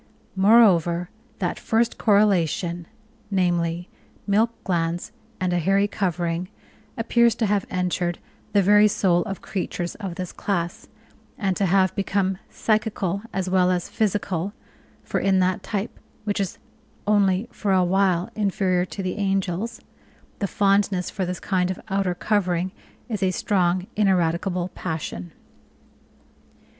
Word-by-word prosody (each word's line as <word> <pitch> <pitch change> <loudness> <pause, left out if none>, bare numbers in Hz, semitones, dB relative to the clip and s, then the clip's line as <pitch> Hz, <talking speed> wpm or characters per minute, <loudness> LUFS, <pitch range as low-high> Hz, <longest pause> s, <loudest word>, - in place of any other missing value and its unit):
Moreover, 190 -4 +4 0.3
that - - -2
first 230 +1 0
correlation, 175 -5 +2 0.4
namely, 175 -2 0 0.4
milk 215 +3 +3
glands 170 +1 -1 0.3
and 185 -1 0
a 175 - +2
hairy 195 +4 +3
covering, 175 -3 -2 0.5
appears 235 0 +3
to 230 - 0
have 205 -1 0
entered 180 -1 -1 0.3
the 200 -2 +4
very 210 +2 +6
soul 180 -4 +2
of 195 - -6
creatures 180 -2 -3
of 195 -5 -6
this 180 -1 -5
class, 175 -3 -3 0.5
and 195 -3 0
to 195 - +1
have 190 +1 +3
become 195 -1 0
psychical 210 -4 0
as 190 -1 -2
well 185 -1 +3
as 180 -1 -1
physical, 200 -3 -1 0.5
for - - -1
in 195 -1 +2
that 185 0 +1
type, 210 +2 -4 0.2
which 205 -1 -1
is 195 -3 -2 0.5
only 200 0 +2
for 205 - -2
a 185 -1 +4
while 185 -1 +2
inferior 190 -3 +1
to 195 +1 -6
the 185 +2 -3
angels, 195 +2 -1 0.6
the 200 - 0
fondness 195 -2 +1
for 190 -2 -2
this 180 0 -3
kind 185 -2 0
of 185 - -3
outer 195 -2 0
covering 185 -2 0 0.4
is 220 -4 -3
a 190 - +3
strong, 185 -2 +1
ineradicable 180 -2 +1
passion!" 120 - -5
190 Hz, 130 wpm, -24 LUFS, 175-205 Hz, 0.6 s, very